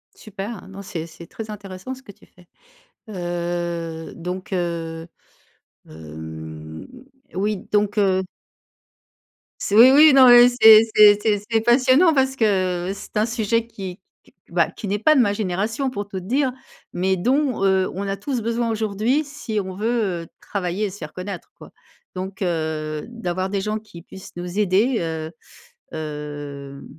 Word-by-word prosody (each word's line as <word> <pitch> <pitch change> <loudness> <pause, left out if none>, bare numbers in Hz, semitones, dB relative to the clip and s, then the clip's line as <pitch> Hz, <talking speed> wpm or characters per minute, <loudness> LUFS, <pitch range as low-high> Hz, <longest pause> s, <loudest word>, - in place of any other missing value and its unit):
Super! 205 -1 -8
Non, 195 +1 -9
c'est 170 -4 -6
c'est 170 +1 -13
très 220 +5 -8
intéressant, 200 +3 -7
ce 265 - -15
que 205 - -12
tu - - -23
fais, 180 -1 -22 0.6
heu, 175 -3 -4
donc, 180 +3 -6
heu, 165 -2 -3 0.8
hem, 80 0 -9 0.5
oui, 205 +3 0 0.2
donc, 210 0 +1
heu 190 -2 +3 1.4
C 200 - -2
oui, 240 +4 +9
oui, 300 +2 +8
non 260 -2 +8
mais 245 0 +9
c'est 225 -3 +8
c'est 210 -1 +8
c'est 210 -2 +1
c'est 225 -1 +3
passionnant 255 +8 +4
parce 265 -1 +1
que, 185 -5 +1
c'est 200 - -12
un 210 +1 +3
sujet 230 0 0
qui 190 -5 -8 0.2
qu - - -24 0.2
bah, - - +2
qui 215 - -8
n'est 205 +2 0
pas 305 +9 +4
de 275 - +4
ma 205 -4 +3
génération, 215 +6 -2
pour 205 -5 -5
tout 190 -2 -5
te - - -12
dire, 260 +5 +1 0.4
mais 190 +2 0
dont, 255 +3 +1
heu, 190 -1 +2
on 200 +2 -4
a 195 0 -2
tous 245 +5 -3
besoin 230 +1 -1
aujourd'hui, 220 +6 0
si 275 -6 -5
on 190 -1 -6
veut, 210 -4 -1
heu, - - -15
travailler 195 +1 -2
et - - -4
se 195 - -11
faire 155 - -8
connaître, 185 - -7
quoi. - - -13 0.4
Donc, 190 +2 -6
heu, 155 -3 -2
d'avoir 190 -6 -3
des 200 -1 -1
gens 215 +1 -2
qui 210 -6 -13
puissent 190 +2 -12
nous 175 +2 -5
aider, 210 +5 +2
heu, 160 -1 -4 0.6
hem, 145 -2 -7
195 Hz, 165 wpm, -22 LUFS, 175-225 Hz, 1.4 s, oui